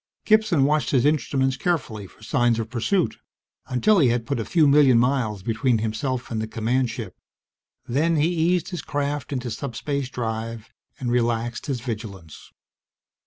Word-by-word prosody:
Gibson 215 Hz, -9 st, +4 dB
watched 150 Hz, +2 st, +2 dB
his 130 Hz, -2 st, +2 dB
instruments 135 Hz, -2 st, +1 dB
carefully 125 Hz, -, -2 dB
for 110 Hz, -, -20 dB
signs 120 Hz, +1 st, +2 dB
of 115 Hz, 0 st, -4 dB
pursuit 165 Hz, -, 0 dB, 0.5 s
until 195 Hz, +11 st, +3 dB
he 140 Hz, -, +5 dB
had 120 Hz, -1 st, 0 dB
put 140 Hz, -2 st, -2 dB
a 115 Hz, -, -2 dB
few 160 Hz, -4 st, +3 dB
million 140 Hz, -3 st, +6 dB
miles 115 Hz, -5 st, +1 dB
between 115 Hz, +2 st, +1 dB
himself 120 Hz, +4 st, -3 dB
and 110 Hz, -1 st, -1 dB
the 110 Hz, -, -3 dB
command 120 Hz, +3 st, 0 dB
ship. 110 Hz, -5 st, -6 dB, 0.7 s
Then 155 Hz, +7 st, +1 dB
he 155 Hz, +2 st, +2 dB
eased 175 Hz, +1 st, +1 dB
his 175 Hz, -5 st, -4 dB
craft 145 Hz, 0 st, -3 dB
into 125 Hz, -3 st, -3 dB
subspace 140 Hz, +3 st, -3 dB
drive 115 Hz, -1 st, -5 dB, 0.3 s
and 125 Hz, -2 st, -2 dB
relaxed 120 Hz, 0 st, -1 dB
his 130 Hz, -4 st, -2 dB
vigilance. 105 Hz, -, -7 dB
125 Hz, 160 wpm, -24 LUFS, 115-145 Hz, 0.7 s, million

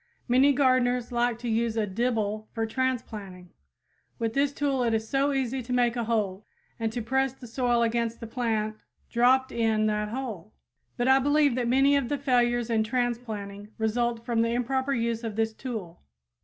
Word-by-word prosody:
Many 260 Hz, +3 st, +5 dB
gardeners 255 Hz, -3 st, +2 dB
like 240 Hz, -1 st, +1 dB
to 240 Hz, +1 st, -6 dB
use 230 Hz, 0 st, 0 dB
a 220 Hz, -, +2 dB
dibble 215 Hz, 0 st, -1 dB
for 225 Hz, -1 st, -1 dB
transplanting. 220 Hz, -7 st, -3 dB, 0.7 s
With 225 Hz, -1 st, -2 dB
this 275 Hz, +1 st, +2 dB
tool 280 Hz, -2 st, 0 dB
it 230 Hz, -2 st, +2 dB
is 220 Hz, 0 st, -2 dB
so 275 Hz, +4 st, +1 dB
easy 265 Hz, -1 st, -1 dB
to 245 Hz, +1 st, -8 dB
make 245 Hz, -1 st, +2 dB
a 235 Hz, -2 st, -1 dB
hole, 210 Hz, -4 st, -1 dB, 0.4 s
and 225 Hz, -1 st, -1 dB
to 235 Hz, 0 st, -4 dB
press 265 Hz, +2 st, +1 dB
the 265 Hz, -, -13 dB
soil 240 Hz, 0 st, +1 dB
against 230 Hz, 0 st, -1 dB
the -, -, -6 dB
plant 220 Hz, -2 st, -2 dB, 0.3 s
dropped 255 Hz, +2 st, +3 dB
in 220 Hz, -2 st, +1 dB
that 210 Hz, 0 st, 0 dB
hole! 220 Hz, -5 st, -6 dB, 0.4 s
But 245 Hz, -, 0 dB
I 265 Hz, 0 st, +6 dB
believe 290 Hz, 0 st, +3 dB
that 245 Hz, -1 st, -1 dB
many 270 Hz, +3 st, +4 dB
of 275 Hz, -4 st, 0 dB
the 290 Hz, -, 0 dB
failures 240 Hz, -3 st, +1 dB
in 220 Hz, -1 st, +2 dB
transplanting 220 Hz, -4 st, -3 dB
result 230 Hz, +1 st, -1 dB
from 235 Hz, -2 st, +1 dB
the 230 Hz, 0 st, +1 dB
improper 265 Hz, +3 st, 0 dB
use 230 Hz, 0 st, -1 dB
of 225 Hz, -3 st, -4 dB
this 220 Hz, 0 st, 0 dB
tool. 220 Hz, -9 st, -6 dB
235 Hz, 185 wpm, -27 LUFS, 220-255 Hz, 0.7 s, I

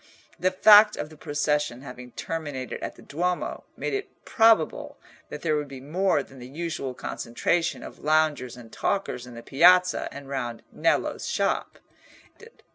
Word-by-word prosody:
The 185 Hz, -, +3 dB
fact 210 Hz, +3 st, +7 dB
of 150 Hz, -, -5 dB
the -, -, -12 dB
procession 145 Hz, -3 st, -1 dB
having 125 Hz, -2 st, -9 dB
terminated 145 Hz, -6 st, -5 dB
at -, -, -5 dB
the -, -, -15 dB
Duomo 175 Hz, +4 st, -2 dB
made -, -, -3 dB
it 405 Hz, -1 st, -3 dB, 0.2 s
probable 225 Hz, 0 st, +3 dB, 0.3 s
that -, -, -8 dB
there 155 Hz, -2 st, +2 dB
would 150 Hz, -1 st, -2 dB
be 135 Hz, -1 st, -9 dB
more 155 Hz, +2 st, +1 dB
than 135 Hz, -1 st, -15 dB
the 125 Hz, -, -9 dB
usual 140 Hz, -3 st, -4 dB
concentration 165 Hz, +11 st, -1 dB
of -, -, -10 dB
loungers 155 Hz, -5 st, +1 dB
and 115 Hz, -2 st, -13 dB
talkers 125 Hz, -11 st, -2 dB
in 120 Hz, -, -11 dB
the 115 Hz, -, -9 dB
Piazza 180 Hz, +7 st, +4 dB
and 140 Hz, -1 st, -9 dB
round 125 Hz, -4 st, -4 dB
Nello's -, -, 0 dB
shop. -, -, -1 dB
150 Hz, 155 wpm, -26 LUFS, 130-175 Hz, 0.3 s, fact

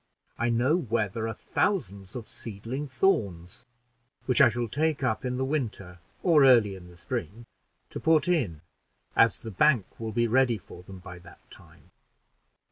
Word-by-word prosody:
I 120 Hz, -, +1 dB
know 125 Hz, +8 st, +2 dB
where 115 Hz, -, -1 dB
there 110 Hz, +3 st, -4 dB
are 110 Hz, -, -3 dB
thousands 100 Hz, -, -2 dB
of 120 Hz, -3 st, -6 dB
seedling 115 Hz, +7 st, -5 dB
thorns, 100 Hz, -, -1 dB, 0.6 s
which 130 Hz, +3 st, +3 dB
I 135 Hz, -, +8 dB
shall 120 Hz, +1 st, -2 dB
take 150 Hz, +4 st, -1 dB
up 110 Hz, -4 st, 0 dB
in 125 Hz, -1 st, -2 dB
the 130 Hz, -, -1 dB
winter, 110 Hz, -, -4 dB, 0.2 s
or 160 Hz, -6 st, +5 dB
early 120 Hz, -7 st, +5 dB
in 90 Hz, -2 st, -11 dB
the 90 Hz, -1 st, -16 dB
spring, 100 Hz, +6 st, -5 dB, 0.5 s
to -, -, -5 dB
put 160 Hz, +1 st, +3 dB
in, 120 Hz, -, 0 dB, 0.5 s
as 115 Hz, -, +4 dB
the 110 Hz, -, -7 dB
bank 125 Hz, 0 st, +2 dB
will 110 Hz, -1 st, -4 dB
be 120 Hz, +2 st, +1 dB
ready 120 Hz, 0 st, +2 dB
for 95 Hz, -2 st, -13 dB
them 95 Hz, +1 st, -11 dB
by 90 Hz, -1 st, -11 dB
that 85 Hz, 0 st, -18 dB
time." -, -, -18 dB
115 Hz, 170 wpm, -27 LUFS, 100-135 Hz, 0.6 s, I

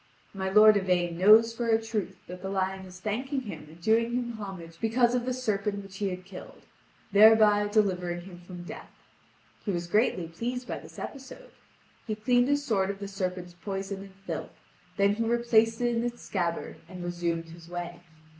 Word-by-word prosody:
My 190 Hz, -1 st, -2 dB
lord 215 Hz, +1 st, +7 dB
Yvain 180 Hz, -3 st, +1 dB
knows 215 Hz, +5 st, +6 dB
for 235 Hz, 0 st, -3 dB
a 225 Hz, -1 st, +4 dB
truth 215 Hz, -4 st, -3 dB
that 180 Hz, +1 st, -9 dB
the 190 Hz, -, -4 dB
lion 190 Hz, 0 st, -2 dB
is 180 Hz, 0 st, -12 dB
thanking 260 Hz, +8 st, -2 dB
him 165 Hz, -10 st, -8 dB
and 160 Hz, +2 st, -15 dB
doing 225 Hz, +5 st, +2 dB
him 245 Hz, -1 st, -1 dB
homage 190 Hz, -7 st, -8 dB
because 235 Hz, +2 st, +3 dB
of 245 Hz, -1 st, 0 dB
the 255 Hz, -, -1 dB
serpent 210 Hz, -5 st, -1 dB
which 195 Hz, 0 st, -11 dB
he 200 Hz, -1 st, 0 dB
had 180 Hz, 0 st, -6 dB
killed, -, -, -11 dB, 0.5 s
thereby 210 Hz, 0 st, +7 dB
delivering 180 Hz, -5 st, +1 dB
him 175 Hz, -1 st, -11 dB
from 175 Hz, 0 st, -9 dB
death. 175 Hz, -, -9 dB, 0.7 s
He -, -, -4 dB
was 175 Hz, -3 st, -1 dB
greatly 185 Hz, -2 st, +1 dB
pleased 245 Hz, +9 st, -4 dB
by -, -, -4 dB
this -, -, -14 dB
episode. 275 Hz, -, -8 dB, 0.6 s
He 215 Hz, -, -1 dB
cleaned 245 Hz, +3 st, +3 dB
his 285 Hz, 0 st, +1 dB
sword 195 Hz, -6 st, +1 dB
of 200 Hz, -, -3 dB
the 200 Hz, 0 st, -6 dB
serpent's 180 Hz, -2 st, -4 dB
poison 195 Hz, +2 st, -5 dB
and 195 Hz, -1 st, -12 dB
filth; 165 Hz, -4 st, -5 dB, 0.4 s
then 200 Hz, 0 st, +4 dB
he 225 Hz, +2 st, -1 dB
replaced 230 Hz, -1 st, +3 dB
it 240 Hz, -1 st, +1 dB
in 230 Hz, -, 0 dB
its 240 Hz, 0 st, -4 dB
scabbard, 170 Hz, -4 st, -2 dB
and 180 Hz, -1 st, -7 dB
resumed 170 Hz, -1 st, -2 dB
his 165 Hz, 0 st, -13 dB
way. 175 Hz, 0 st, -5 dB
200 Hz, 190 wpm, -28 LUFS, 180-225 Hz, 0.7 s, lord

